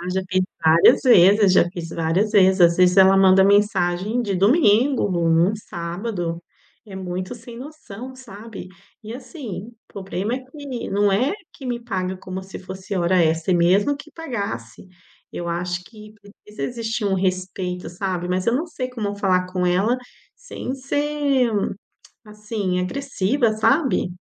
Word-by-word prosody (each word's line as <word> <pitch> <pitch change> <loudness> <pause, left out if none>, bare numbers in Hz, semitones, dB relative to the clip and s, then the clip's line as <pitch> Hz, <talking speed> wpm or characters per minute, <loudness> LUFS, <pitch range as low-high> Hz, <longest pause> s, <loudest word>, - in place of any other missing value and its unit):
Ah, 175 - -6
já 190 - 0
teve 185 -1 +1 0.2
várias 160 +1 +6
vezes, 200 -3 +6
eu - - +7
já 175 - -6
fiz 170 -3 -7
várias 170 +6 0
vezes. 190 -2 +4
Às 170 -1 +6
vezes 180 +1 +4
ela 190 0 +7
manda 190 0 +6
mensagem 200 +1 +2
de 200 -4 -2
domingo, 225 - +3
num 170 -2 0
num 170 +6 +3
sábado, 175 -2 -5 0.4
é 200 - -11
muito 185 +3 -5
sem 230 0 -12
noção, 260 -4 -10
sabe? 220 -5 -10 0.3
E 220 +1 -8
assim, 250 - -8
o 240 - -16 0.2
poblema 195 +3 -3
é 260 - -4
que 270 -2 -7
não 205 +1 +2
é 250 - +1 0.2
que 270 - -10
me 240 -1 -3
paga 190 -5 -3
como 185 0 -7
se 190 0 -9
fosse 190 +1 -7
hora 175 0 +2
extra, 160 +3 +1
e - - +3
mesmo 195 +11 +3
que 290 +2 -13
pagasse. 200 - -6 0.5
Eu 175 - -5
acho 175 +1 -3
que 215 -1 -14 0.3
precisa 210 0 -9
existir 230 -2 -3
um 200 - +1
respeito, 185 -1 -2
sabe, 180 -1 -3
mas 185 +2 -1
eu 235 - +2
não 305 +7 -1
sei 255 -6 -5
como 215 -5 -4
falar 185 -2 +1
com 180 -1 0
ela 195 +7 +2 0.4
sem - - -6
ser, 280 -2 0 0.8
assim, 210 -3 -3
agressiva, 245 +1 0
sabe? 260 - +1
200 Hz, 165 wpm, -22 LUFS, 180-235 Hz, 0.8 s, eu